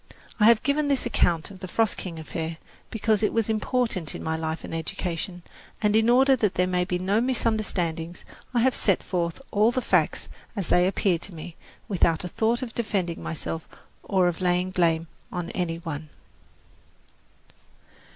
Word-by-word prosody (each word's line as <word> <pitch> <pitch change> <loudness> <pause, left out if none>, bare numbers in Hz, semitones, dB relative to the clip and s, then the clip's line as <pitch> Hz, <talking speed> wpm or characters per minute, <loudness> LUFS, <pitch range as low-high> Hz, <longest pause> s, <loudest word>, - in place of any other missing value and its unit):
I 210 - +5
have 230 -1 +6
given 290 +2 +1
this 275 -3 +1
account 175 -6 +1
of 190 - -11
the 185 - -6
"Frost 225 +3 +1
King" 170 -3 -6
affair 160 +1 -4 0.3
because 220 -1 +1
it 215 - +2
was 225 -1 0
important 220 - 0
in - - -6
my 160 0 -1
life 160 0 -3
and - - -7
education; 170 +2 -3 0.4
and, 210 -1 +2
in 220 +1 +4
order 265 +2 +6
that 210 -5 +1
there 180 - +3
might 180 -1 0
be 180 - 0
no 195 +5 +1
misunderstanding, 195 -9 0 0.4
I 240 -2 +2
have 260 +1 +4
set 195 -5 +2
forth 170 0 -2
all 210 +2 +4
the 245 - 0
facts - - +1 0.3
as 195 -6 -3
they 180 +1 +4
appear 190 -2 +1
to 180 +1 -9
me, 165 +1 -8 0.3
without 170 -4 +2
a - - -3
thought 230 +7 0
of 230 -3 -6
defending 190 -7 -1
myself 160 0 -4 0.3
or 185 -2 +2
of 175 0 -2
laying 180 0 +1
blame 165 -3 +2 0.3
on 175 -1 -4
any 175 -3 -1
one. 160 -2 -6
185 Hz, 175 wpm, -26 LUFS, 170-220 Hz, 0.4 s, have